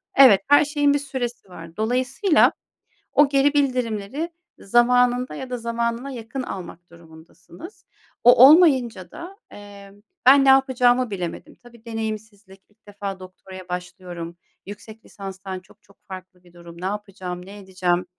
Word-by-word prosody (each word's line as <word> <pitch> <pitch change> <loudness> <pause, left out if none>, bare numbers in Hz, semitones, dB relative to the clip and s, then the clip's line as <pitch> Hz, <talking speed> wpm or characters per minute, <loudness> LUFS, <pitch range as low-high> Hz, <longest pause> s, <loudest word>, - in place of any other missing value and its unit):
Evet, 255 -8 +7
her 290 +1 +5
şeyin 290 -1 +1
bir 290 - +1
süresi 260 -7 -6
var. 165 -1 -12
Dolayısıyla, 255 - +2 0.6
o 290 -1 +4
geri 280 +1 +2
bildirimleri 255 +1 -2 0.3
zamanında 245 +3 +2
ya 265 - -8
da 250 - -4
zamanına 235 +2 -3
yakın 245 +1 -6
almak 175 -5 -9
durumundasınız. 170 - -15 0.4
O 245 +1 +8
olmayınca 265 - +3
da, 365 +3 -10
eee, 200 -1 -13 0.3
ben 275 +1 +7
ne - - +5
yapacağımı 255 -2 +3
bilemedim. 180 -4 -6
Tabii 235 -1 -18
deneyimsizlik, 215 -3 -7
ilk 205 +1 -36
defa 200 -1 -7
doktoraya 185 0 -13
başlıyorum, 180 -1 -7 0.3
yüksek 215 +2 -12
lisanstan 190 -1 -8
çok 190 +3 -24
çok 200 - -25
farklı 185 -1 -11
bir 175 -1 -22
durum. 170 -1 -14
Ne - - -5
yapacağım, 190 -3 -6
ne 200 +2 -12
edeceğim? 185 -2 -2
220 Hz, 140 wpm, -22 LUFS, 185-255 Hz, 0.6 s, O